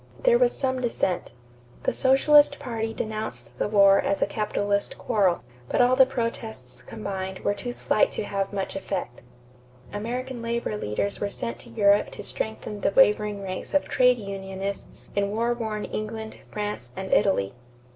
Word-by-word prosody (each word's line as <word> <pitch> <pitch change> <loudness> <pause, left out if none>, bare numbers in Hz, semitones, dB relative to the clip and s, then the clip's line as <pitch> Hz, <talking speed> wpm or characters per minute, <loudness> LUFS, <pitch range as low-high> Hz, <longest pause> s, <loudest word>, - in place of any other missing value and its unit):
There - - +5
was - - +3
some 260 -1 0
dissent. 195 -7 -1 0.5
The - - +1
Socialist 285 +2 +5
party 225 -5 -3
denounced 215 - -4
the - - +1
war 200 -2 +6
as 195 - 0
a - - +3
capitalist 205 -1 -1
quarrel; 190 - +1 0.3
but - - 0
all 250 +1 +5
the 265 -1 +7
protests 220 - -4
combined 190 - -5
were 205 - +1
too 205 +5 -5
slight 215 - +2
to - - -2
have 195 -1 -2
much 195 -1 -3
effect. 185 -10 -4 0.7
American 240 +4 -4
labor 230 -2 -2
leaders 200 - -2
were 205 - -1
sent 115 -11 -5
to - - -14
Europe 205 -2 +4
to - - -7
strengthen 215 -1 -4
the - - +3
wavering 210 -3 +3
ranks 185 +8 -4
of 290 - +3
trade 250 -1 +4
unionists 195 -1 -6
in 200 0 +1
war 230 +3 +1
worn 220 -3 -3
England, 220 +1 -5
France, 205 -13 -4
and 190 0 -3
Italy. 100 - +3
210 Hz, 160 wpm, -26 LUFS, 195-235 Hz, 0.7 s, the